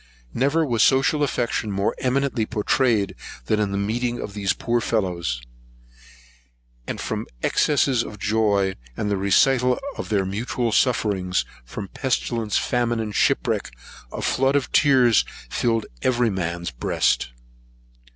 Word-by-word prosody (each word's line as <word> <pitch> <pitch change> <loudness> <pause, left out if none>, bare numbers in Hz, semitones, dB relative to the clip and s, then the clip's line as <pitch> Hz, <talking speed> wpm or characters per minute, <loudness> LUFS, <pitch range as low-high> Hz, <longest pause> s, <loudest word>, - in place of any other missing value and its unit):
Never 140 +6 +2
was 120 -5 0
social 135 +5 +3
affection 120 -5 -1
more 100 0 0
eminently 130 -3 0
pourtrayed 110 -1 +1 0.3
than 105 - +1
in 105 -2 0
the 100 - -1
meeting 120 +4 -1
of 100 - -6
these 100 -2 0
poor 120 0 0
fellows; 85 - -1 1.4
and - - -4
from - - -3 0.2
excess 145 -2 +2
of 105 - -7
joy, 105 -3 +1 0.2
and 105 - -1
a - - +2
recital 125 +6 +3 0.2
of - - -5
their 100 -3 +1
mutual 115 +4 -2
sufferings, 100 -7 +1 0.2
from - - -7
pestilence, 120 -3 -1
famine, 120 -2 0
and 110 -2 -3
shipwreck, - - +1 0.4
a - - -5
flood 135 +2 +2
of 140 -2 0
tears 125 -5 +5 0.3
filled 115 -2 0 0.2
every 120 -3 +2
man's 85 -2 -3
breast. - - 0
110 Hz, 130 wpm, -23 LUFS, 100-125 Hz, 1.4 s, tears